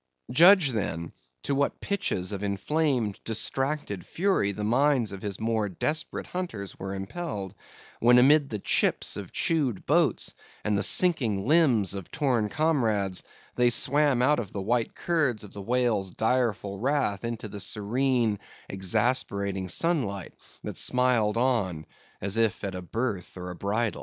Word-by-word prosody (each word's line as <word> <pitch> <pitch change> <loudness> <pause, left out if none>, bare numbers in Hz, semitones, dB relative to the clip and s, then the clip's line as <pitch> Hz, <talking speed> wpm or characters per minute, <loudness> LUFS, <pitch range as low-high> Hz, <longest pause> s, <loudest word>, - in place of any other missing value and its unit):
Judge, 175 +2 +7
then, 85 -8 -3 0.3
to 140 - -1
what 140 +1 0
pitches 105 - -2
of 100 -1 -4
inflamed, 115 +2 -1
distracted 125 -2 -2
fury 185 - 0
the 105 +1 -5
minds 125 0 +2
of 100 -1 -7
his 100 -2 -4
more 110 -2 0
desperate 150 - -2
hunters 140 - -5
were 95 +1 -4
impelled, 100 - -5 0.5
when 120 +1 +6
amid 140 +3 +5
the 110 - -3
chips 100 - +1
of - - -7
chewed 140 - -1
boats, - - +2 0.3
and 105 -1 +1
the 100 - +1
sinking 115 - +3
limbs 130 - +3
of 95 -3 -6
torn 125 -8 0
comrades, 110 - 0 0.3
they 125 0 +3
swam 135 +1 +3
out 150 +2 +3
of 105 -5 -5
the 100 - -5
white 115 +2 0
curds 150 -11 0
of 105 - -11
the 100 - -7
whale's 115 -3 0
direful 110 -3 -1
wrath 130 -5 0
into 115 -2 -4
the 100 0 -8
serene, 115 +2 0 0.3
exasperating 100 -1 -1
sunlight, 110 - -1 0.3
that - - -5
smiled 125 -4 +2
on, 100 -11 0 0.4
as 100 +3 -2
if 115 -3 +1
at 100 -2 -3
a 90 - -5
birth 100 0 -4
or 90 0 -6
a - - -8
bridal. 105 +5 -1
115 Hz, 150 wpm, -27 LUFS, 100-135 Hz, 0.5 s, Judge